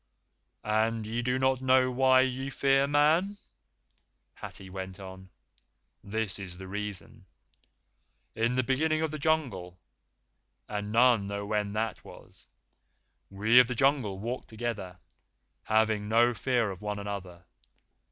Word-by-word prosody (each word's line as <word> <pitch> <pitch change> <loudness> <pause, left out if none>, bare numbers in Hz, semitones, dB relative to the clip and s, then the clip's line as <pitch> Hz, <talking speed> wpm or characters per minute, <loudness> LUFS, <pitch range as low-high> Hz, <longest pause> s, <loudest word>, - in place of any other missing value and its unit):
"And 110 +1 0
ye 115 +3 -2
do 125 +1 0
not 130 0 +1
know 130 0 +4
why 130 +1 +5
ye 130 +1 -2
fear 135 0 +2
Man?" 155 +8 +2 1.0
Hathi 95 - -9
went 95 0 -7
on. 95 -1 -10 0.7
"This 105 -2 -3
is 90 -3 -8
the 95 0 -9
reason. 105 0 -5 1.1
In 115 +2 0
the 130 - +2
beginning 155 +5 +1
of 160 - -1
the 155 - -5
Jungle, 120 - -1 0.9
and 105 0 -4
none 115 -3 +4
know 100 0 -4
when 105 -1 -1
that 110 -1 -2
was, - - -15 0.8
we 110 +5 +5
of 125 - +6
the 125 - -3
Jungle 130 -7 +1
walked 120 +6 -5
together, 110 -5 -5 0.7
having 110 -1 +1
no 120 +2 +4
fear 120 -3 0
of 95 - -9
one 105 0 -3
another. 95 -3 -6
110 Hz, 130 wpm, -29 LUFS, 100-130 Hz, 1.1 s, of